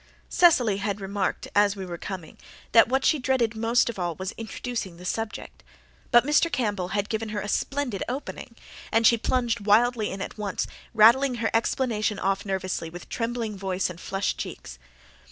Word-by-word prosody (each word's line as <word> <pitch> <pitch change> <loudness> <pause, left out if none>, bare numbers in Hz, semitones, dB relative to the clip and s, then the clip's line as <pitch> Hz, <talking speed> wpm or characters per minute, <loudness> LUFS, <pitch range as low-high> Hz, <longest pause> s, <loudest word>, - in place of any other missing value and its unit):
Cecily 250 - +4
had 200 0 -2
remarked 200 0 -2
as 205 0 +4
we 195 -1 -6
were 175 -2 -7
coming 185 -5 -7 0.3
that 225 0 +6
what 265 +1 +1
she 310 - +3
dreaded 250 -4 +1
most 230 +2 +2
of 235 -5 -4
all 175 -2 -2
was 190 +2 -4
introducing 225 -4 -5
the 180 - -11
subject; 225 +3 -4 0.5
but 240 -1 +5
Mr. 300 +3 +3
Campbell 210 -9 -1
had 200 +2 -1
given 220 0 -3
her 210 -1 -3
a 205 - -5
splendid 270 -2 -1
opening, 250 -2 -6 0.4
and 225 +1 +3
she 235 - +7
plunged 235 0 0
wildly 220 +2 +3
in 195 - -6
at 200 - -6
once, 200 -2 -2 0.3
rattling 245 +4 +6
her 230 -1 -1
explanation 225 -2 0
off 195 +1 -1
nervously 185 -3 -2
with 175 +1 -10
trembling 230 -2 -3
voice 190 -1 -2
and 175 0 -11
flushed 195 0 -2
cheeks. - - -7
215 Hz, 175 wpm, -26 LUFS, 195-240 Hz, 0.5 s, she